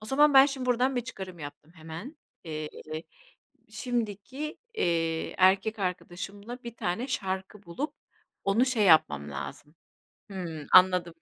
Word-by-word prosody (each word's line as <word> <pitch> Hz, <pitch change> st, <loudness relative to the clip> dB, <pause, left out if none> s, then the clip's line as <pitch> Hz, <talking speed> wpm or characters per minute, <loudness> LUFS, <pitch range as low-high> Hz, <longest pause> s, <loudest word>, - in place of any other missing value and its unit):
O 215 Hz, -, -10 dB
zaman 290 Hz, +2 st, +4 dB
ben 270 Hz, +1 st, +10 dB
şimdi 265 Hz, -2 st, -4 dB
buradan 250 Hz, +2 st, +2 dB
bir -, -, +2 dB
çıkarım 190 Hz, -8 st, -8 dB
yaptım 150 Hz, +2 st, -10 dB
hemen. 165 Hz, -, -8 dB, 0.3 s
Eee, 155 Hz, -1 st, -4 dB, 1.0 s
şimdiki, 245 Hz, +4 st, -3 dB, 0.2 s
eee, 165 Hz, -, 0 dB
erkek 195 Hz, +4 st, +4 dB
arkadaşımla 200 Hz, +6 st, -5 dB
bir 235 Hz, -1 st, -7 dB
tane 225 Hz, +6 st, -2 dB
şarkı 195 Hz, -4 st, -3 dB
bulup 225 Hz, -, -4 dB, 0.5 s
onu 220 Hz, +6 st, +3 dB
şey 245 Hz, -5 st, +1 dB
yapmam 75 Hz, -, +4 dB
lazım 70 Hz, -, -7 dB, 0.6 s
Hımm, 165 Hz, -6 st, -5 dB
anladım 180 Hz, -2 st, +6 dB
195 Hz, 130 wpm, -28 LUFS, 170-245 Hz, 1.0 s, ben